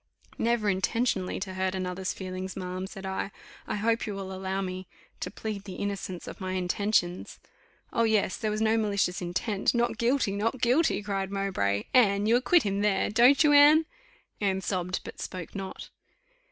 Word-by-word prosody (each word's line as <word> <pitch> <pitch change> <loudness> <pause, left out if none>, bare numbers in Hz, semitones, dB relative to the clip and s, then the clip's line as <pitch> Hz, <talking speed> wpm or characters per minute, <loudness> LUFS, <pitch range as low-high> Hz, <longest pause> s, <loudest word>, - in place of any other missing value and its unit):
"Never 230 -2 +1
intentionally 190 0 0
to 190 0 -4
hurt 185 0 -1
another's 185 0 -3
feelings, 185 0 -6
ma'am," 185 0 -4
said 195 -1 -9
I; 190 +1 -2 0.4
"I - - -2
hope 225 +2 0
you 205 - -3
will 190 -1 -6
allow 190 0 -3
me 185 -1 -4 0.3
to - - -3
plead 215 -3 -5
the 190 - -7
innocence 195 -3 -4
of - - -9
my 185 0 -3
intentions." 185 0 0 0.6
"Oh, - - +1
yes! 220 -4 +2
there 215 - -2
was 215 +1 -1
no 220 +1 +3
malicious 200 -4 0
intent: 195 +6 -1
Not 240 -1 0
guilty 240 -2 +2
Not 225 +6 -1
guilty!" 250 0 +2
cried 195 -2 -2
Mowbray. 190 - -1
"Anne, 205 -5 +4
you 225 +2 +4
acquit 300 +7 +4
him 200 0 -1
there, 205 -1 +1
don't 245 +7 +6
you, 295 -1 +5
Anne?" 295 +2 +7 0.6
Anne 190 -2 +1
sobbed, 185 -1 -2
but - - -9
spoke 180 -3 -6
not. 195 -1 -7
200 Hz, 175 wpm, -28 LUFS, 185-225 Hz, 0.6 s, Anne